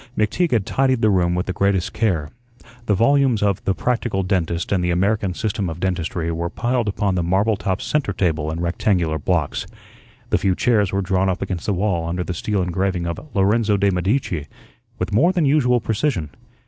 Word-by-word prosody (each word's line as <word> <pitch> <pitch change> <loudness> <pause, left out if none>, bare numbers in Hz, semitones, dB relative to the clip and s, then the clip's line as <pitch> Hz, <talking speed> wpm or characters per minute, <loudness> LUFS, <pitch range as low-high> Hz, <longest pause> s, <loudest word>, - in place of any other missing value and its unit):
McTeague 110 +12 +1
had 115 -7 +1
tidied 130 -3 +1
the 110 - +5
room 90 -2 +2
with 90 - -1
the 95 - -3
greatest 100 -1 0
care. 85 -10 0 0.6
The 105 - +3
volumes 125 0 +3
of 100 -2 0
the 95 - +1
"Practical 115 -5 -1
Dentist" 85 -3 -1
and 95 -3 +1
the 90 - 0
"American 95 +2 +1
System 105 -3 -2
of 80 +1 -6
Dentistry" 85 -2 -2
were 85 +1 -2
piled 120 +2 -1
upon 100 -1 0
the 90 - 0
marble 95 +6 +2
top 95 -1 -2
centre 150 -8 0
table 80 -6 0
in 80 +1 -4
rectangular 85 -2 0
blocks. 80 -1 -1 0.6
The - - +3
few 95 -2 +1
chairs 105 -4 +2
were 100 0 0
drawn 95 0 +1
up 95 - -1
against 90 -3 -4
the 105 - +2
wall 90 -4 0
under 90 +1 -2
the 90 - -4
steel 100 +3 -1
engraving 90 0 -1
of 85 -1 -3 0.2
"Lorenzo 105 +2 +2
de' 100 0 +2
Medici" 90 - -1 0.5
with - - -3
more 160 - +4
than 175 -4 +1
usual 130 -4 +3
precision. 110 - -1
95 Hz, 195 wpm, -21 LUFS, 90-110 Hz, 0.6 s, the